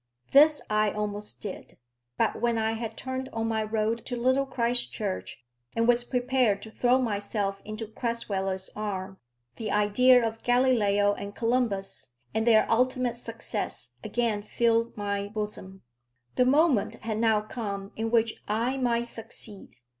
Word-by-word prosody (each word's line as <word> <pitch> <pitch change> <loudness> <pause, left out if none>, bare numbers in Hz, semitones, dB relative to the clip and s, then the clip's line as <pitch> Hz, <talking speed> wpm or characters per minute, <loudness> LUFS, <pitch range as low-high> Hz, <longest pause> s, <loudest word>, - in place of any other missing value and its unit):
This 300 +2 +6
I 215 0 +2
almost 210 0 -4
did. 200 -3 -7 0.4
But - - 0
when 235 -1 +2
I 220 0 +1
had 225 0 -5
turned 260 0 -4
on 225 0 -2
my 220 -1 0
road 220 +1 -1
to 245 - -2
Little 260 +3 +2
Christchurch, 125 - -2 0.3
and 230 0 +2
was 240 0 +4
prepared 245 -4 +1
to 220 - -9
throw 245 +3 +3
myself 205 -4 -2
into 215 +1 -5
Crasweller's 200 -4 -2
arms, 195 -2 -4 0.4
the 220 - -4
idea 230 +4 +5
of 225 0 -6
Galileo 220 -5 +3
and 200 0 -7
Columbus, 230 - -1 0.2
and 220 +1 0
their 220 -2 +6
ultimate 250 +1 +1
success, 225 - -4
again 230 -4 0
filled 230 +2 +1
my 200 -1 -2
bosom. 205 -3 -6 0.5
The 250 - +3
moment 280 -4 +3
had 220 -1 -2
now 220 -2 +3
come 200 -3 -5
in 225 +1 -2
which 230 -1 +1
I 235 +5 0
might 240 -2 +1
succeed. 225 -3 -8
225 Hz, 145 wpm, -28 LUFS, 205-240 Hz, 0.5 s, This